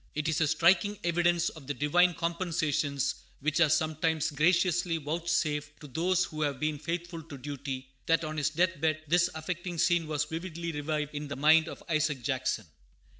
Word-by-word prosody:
It 155 +1 -1
is 160 0 +1
a 155 - +4
striking 190 +7 +3
evidence 175 0 +2
of 155 -5 -13
the 145 - -2
divine 175 +4 +3
compensations 155 -5 -1 0.3
which 155 +3 0
are 165 -3 +5
sometimes 155 0 +1
graciously 170 +2 +2
vouchsafed 150 -2 -1
to - - -11
those 175 +6 +1
who 155 -1 -6
have 145 -3 0
been 155 0 -1
faithful 170 +2 -4
to 155 -3 -10
duty, 135 -1 -5 0.2
that 165 0 +3
on 155 0 -4
his 150 +1 +1
death 170 +1 0
bed 155 -1 +1
this 175 +3 +3
affecting 170 +2 -4
scene 170 -1 +2
was 150 -1 0
vividly 170 +1 -5
revived 150 0 -2
in 150 0 -4
the 140 - -5
mind 155 +4 +5
of - - -8
Isaac 155 -5 0
Jackson. 130 +1 -1
155 Hz, 175 wpm, -29 LUFS, 150-170 Hz, 0.3 s, are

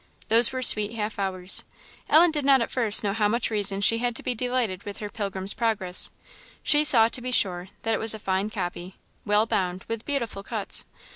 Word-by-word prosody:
Those 230 +1 +4
were 260 -1 -4
sweet 215 -2 +5
half 215 -2 -5
hours. 190 -1 -2 0.5
Ellen 330 +2 +5
did 300 -2 -3
not 270 -1 +4
at 230 - -3
first 225 -5 +5
know 200 -1 -1
how 215 -1 +1
much 230 +2 -1
reason 200 -2 -1
she 230 +3 +3
had 240 0 -2
to - - -4
be 250 - -2
delighted 245 -5 -2
with 200 -1 -9
her 210 -1 -7
Pilgrim's 195 -2 -1
Progress: 205 -6 0 0.5
she 295 0 +4
saw, 240 -7 +5
to 245 - -3
be 250 +1 -5
sure, 185 -6 0
that 225 - 0
it - - -1
was 225 0 +3
a - - -6
fine 195 0 -2
copy, 185 -3 -6 0.3
well 210 +1 +2
bound, 185 -4 -3
with 225 0 -5
beautiful 235 -8 -4
cuts. - - -2
215 Hz, 210 wpm, -24 LUFS, 195-240 Hz, 0.5 s, sweet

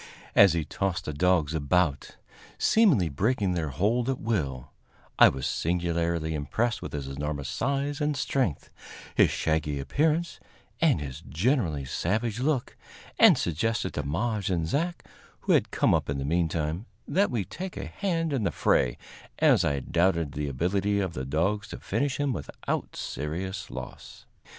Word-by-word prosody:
As 100 -4 +7
he 80 -3 -1
tossed 95 +3 -2
the 75 - -3
dogs 80 -1 +2
about, 75 -1 0 0.4
seemingly 185 - +4
breaking 100 - 0
their 85 -4 -1
hold 115 - 0
at 135 - -1
will, 70 - -2 0.5
I - - +9
was 65 -1 -4
singularly 85 -1 -1
impressed 110 +11 -1
with - - -7
his 70 -2 -3
enormous 70 0 -4
size 140 - -1
and 150 -1 0
strength, 130 - -1 0.4
his - - +5
shaggy 80 -2 -1
appearance 155 - 0 0.4
and 160 - +4
his 70 -3 -6
generally 85 - 0
savage 110 - -1
look, 135 -1 0 0.4
and - - +8
suggested 95 +4 -1
to 75 - -2
Maje 100 +8 -1
and 85 -3 0
Zach, 170 - -2 0.4
who - - 0
had - - +3
come - - +2
up - - 0
in 70 - -1
the 70 - -3
meantime, 80 - -1 0.2
that 200 +2 +2
we 110 -6 -1
take 185 - -7
a - - -4
hand 165 -6 -2
in 135 - 0
the 100 - +1
fray, - - +2 0.4
as - - +4
I 70 -1 0
doubted 85 -1 +1
the 75 +1 -3
ability 95 +8 0
of 95 -4 -2
the 65 -2 -4
dogs 95 +9 0
to - - -8
finish 140 -1 -1
him 145 -2 +1
without 70 -7 -4
serious 90 +7 -4
loss. - - -9
90 Hz, 160 wpm, -27 LUFS, 75-120 Hz, 0.5 s, I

